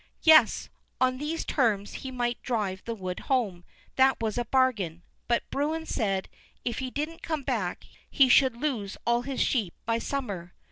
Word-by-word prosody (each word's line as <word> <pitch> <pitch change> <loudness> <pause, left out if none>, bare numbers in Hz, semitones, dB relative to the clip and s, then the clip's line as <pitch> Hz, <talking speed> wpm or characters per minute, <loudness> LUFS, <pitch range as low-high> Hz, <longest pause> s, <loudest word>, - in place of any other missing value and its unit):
Yes; 315 -2 +6 0.3
on 255 0 +2
these 310 +3 -3
terms 215 -7 +1
he 265 - -5
might 245 -2 -2
drive 205 -6 -2
the 230 - -3
wood 185 -3 -5
home, 215 -10 -1 0.3
that 265 0 +5
was 220 -2 -1
a 240 - -1
bargain; 215 -10 +1 0.2
but 235 -1 +1
Bruin 310 +3 -1
said, 195 -9 -1 0.4
if 240 - -1
he 260 -1 -3
didn't 305 +5 -4
come 310 -4 -3
back, 220 -10 -2 0.2
he 270 -3 +5
should 255 0 +5
lose 240 -8 -2
all 235 0 +3
his 270 +1 -3
sheep 215 -10 +1
by 230 0 +1
summer. 200 -12 -4
245 Hz, 170 wpm, -28 LUFS, 205-270 Hz, 0.4 s, Yes